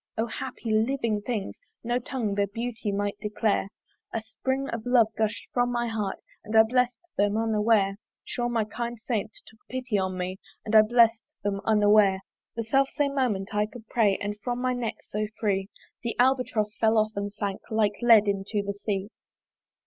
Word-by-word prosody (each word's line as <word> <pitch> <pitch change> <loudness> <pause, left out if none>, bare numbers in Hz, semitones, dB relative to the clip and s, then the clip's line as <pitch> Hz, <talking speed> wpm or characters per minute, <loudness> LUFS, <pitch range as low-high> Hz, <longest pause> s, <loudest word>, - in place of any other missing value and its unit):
O 225 - +1
happy 235 -1 -5
living 220 -1 +1
things! 215 -2 -4 0.2
no 240 +1 0
tongue 240 -4 -2
Their 200 0 +1
beauty 230 +1 -3
might 205 +1 -2
declare: 210 -1 0 0.4
A 225 - -1
spring 265 +4 -2
of 230 -1 -4
love 240 -3 +5
gusht 220 0 -1
from 245 0 +2
my 240 0 0
heart, 210 -4 -2 0.3
And 220 - -5
I 220 - +9
bless'd 250 +8 0
them 205 +1 +3
unaware! 215 -3 +2 0.3
Sure 240 0 -2
my 230 -2 +1
kind 235 +3 -4
saint 220 -2 -2
took 220 - -18
pity 255 -5 -1
on 190 -1 -2
me, 185 +1 -3 0.3
And 220 - 0
I 215 - +10
bless'd 230 0 +3
them 200 -1 -1
unaware. 205 -2 +4 0.3
The 230 - -2
self 270 +4 +2
same 290 -2 0
moment 215 -7 -1
I 210 0 +1
could 225 0 -12
pray; 210 -5 +3
And 205 +1 -4
from 245 0 -2
my 255 0 +1
neck 245 -3 -2
so 210 +1 -2
free 195 -2 0 0.3
The 235 -2 -3
Albatross 245 -4 +2
fell 220 0 +3
off, 215 0 +3
and 200 0 -3
sank 200 -1 -4
Like 215 -2 +2
lead 225 -3 +6
into 200 +1 -1
the 200 - -2
sea. 200 0 -3
220 Hz, 180 wpm, -27 LUFS, 205-240 Hz, 0.4 s, I